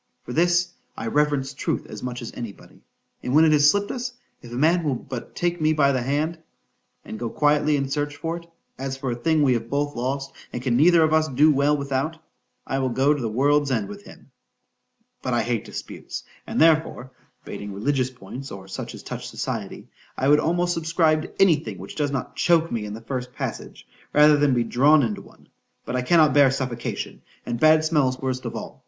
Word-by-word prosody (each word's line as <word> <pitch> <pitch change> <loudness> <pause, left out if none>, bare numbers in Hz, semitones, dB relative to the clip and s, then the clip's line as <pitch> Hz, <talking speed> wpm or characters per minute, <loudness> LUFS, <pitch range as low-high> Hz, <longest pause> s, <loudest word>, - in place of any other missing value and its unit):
For - - -8
all - - -5
this, 175 +1 +2 0.2
I - - -5
reverence 145 +1 +1
truth 135 - -2
as - - -9
much 125 -1 -5
as 115 - -6
any 115 -3 -5
body; - - -19 0.4
and 125 - -2
when 160 +1 +7
it 155 - +4
has 145 -1 +6
slipped 200 +4 +1
us, 250 0 -4 0.3
if 120 - -12
a - - -5
man 165 +6 +3
will 145 -4 0
but 125 0 -8
take 175 -1 -1
me 155 0 +3
by 140 -2 +3
the 130 -2 0
hand, 150 +6 -1 0.7
and 110 - -7
go 120 - -3
quietly 150 +2 +2
and 135 -1 -2
search 145 0 -2
for 165 +2 -3
it, 170 0 -13 0.3
as 135 0 -4
for 135 -2 -3
a - - -2
thing 155 +5 +1
we 130 -3 +4
have 115 -1 -3
both 145 +1 -1
lost, 135 +3 -3 0.2
and 120 - -5
can 125 -3 +1
neither 165 +5 +5
of 155 0 +2
us 155 0 +3
do 150 +3 +4
well 145 +1 +2
without,—I'll 140 -1 -4
go 135 +4 +3
to 145 - -4
the 115 - -1
world's 145 +5 +2
end 115 -6 0
with 205 0 -10
him:——But 125 -2 -10
I - - +1
hate - - -2
disputes,—and - - -7
therefore 155 -5 +3 0.3
(bating 100 0 -7
religious 130 +6 0
points, 130 +3 -9
or 95 -1 -9
such 95 - -6
as - - -11
touch - - -6
society) - - -5 0.3
I 135 - +1
would 150 +1 +6
almost 175 +3 +1
subscribe 160 -1 +2
to - - -9
any 185 -5 +6
thing 110 -10 -7
which 95 +2 -9
does 145 -2 -1
not 140 -2 -4
choak 165 -1 +2
me 110 -3 -2
in 105 0 -6
the 115 - -9
first 125 +1 -5
passage, - - -6 0.3
rather 150 0 +7
than 145 -3 +3
be 120 - +2
drawn 140 +6 +4
into 110 -3 -2
one——But - - -12
I 125 - +1
cannot 155 +3 +4
bear 145 -2 +6
suffocation,——and 120 -2 -5
bad 155 +1 +5
smells 145 -5 +2
worst 130 -1 -3
of - - -4
all. - - -7
140 Hz, 210 wpm, -24 LUFS, 125-155 Hz, 0.7 s, when